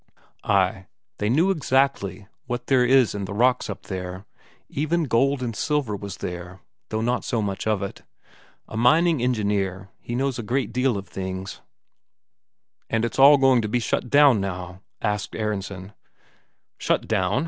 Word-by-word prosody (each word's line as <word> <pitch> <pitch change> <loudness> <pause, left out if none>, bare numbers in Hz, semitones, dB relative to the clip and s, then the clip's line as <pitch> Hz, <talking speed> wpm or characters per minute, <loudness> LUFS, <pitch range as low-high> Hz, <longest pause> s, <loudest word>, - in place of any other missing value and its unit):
Ay, 95 -1 +1 0.3
they 105 - 0
knew 165 +10 +3
exactly 135 - 0 0.2
what 120 0 -3
there 125 -2 +3
was 130 -2 +4
in 100 -1 -4
the 100 - -6
rocks 125 +3 +2
up - - -6
there 95 0 -6 0.4
even 155 +4 -1
gold 135 +1 +1
and 115 -3 -3
silver 145 -5 -1
was 100 -1 -7
there, 90 +1 -6 0.3
though 110 0 -2
not 120 +2 0
so 120 - -1
much 100 -1 -3
of 105 -2 +1
it. 100 - -6 0.7
A - - -9
mining 155 +6 +3
engineer, 100 -5 -1
he 120 - -5
knows 135 0 -1
a - - -4 0.2
deal 125 -1 0
of 100 0 -7
things. 95 0 -6 1.3
"And 115 +1 +1
it's 115 - -4
all 140 +2 +9
going 135 -3 +4
to 110 +3 0
shut 120 +1 -2
down 140 -6 +6
now?" 90 -1 -5 0.2
asked 105 -3 -2
Aronsen. 100 -2 -4 0.9
"Shut - - 0
down?" 95 +6 +1
110 Hz, 155 wpm, -24 LUFS, 95-130 Hz, 1.3 s, all